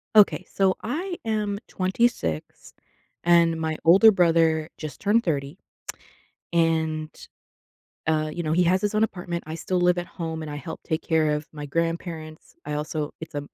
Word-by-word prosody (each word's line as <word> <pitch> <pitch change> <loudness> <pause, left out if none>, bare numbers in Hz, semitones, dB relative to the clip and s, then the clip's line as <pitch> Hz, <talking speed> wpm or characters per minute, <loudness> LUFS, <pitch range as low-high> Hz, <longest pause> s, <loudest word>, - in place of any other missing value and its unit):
Okay. 210 -2 +5
So 190 -1 +2
I 345 - -3
am 210 -2 -1
26, 185 - -1 0.5
and 170 -1 +4
my 160 -1 -1
older 195 +7 +8
brother 165 -4 +3
just 155 -2 -7
turned 215 +4 +3
30. 145 -1 -2 1.0
And, 160 -2 +1 1.0
uh, 155 -1 +1
you 175 - -4
know, 155 - -1
he 180 +2 +4
has 180 +2 +3
his 205 0 0
own 215 +1 +3
apartment. 175 -4 -3
I 160 - -4
still 180 +2 -1
live 180 0 +3
at 175 - -2
home, 160 -2 -5
and 155 - -6
I - - -5
help 145 +3 -7
take 160 -1 -2
care 160 -2 +2
of 150 0 -2
my 150 -1 -6
grandparents. 165 0 -4
I - - -4
also 150 0 -3
it's 160 -1 -8
a - - 0
165 Hz, 170 wpm, -25 LUFS, 155-185 Hz, 1.0 s, older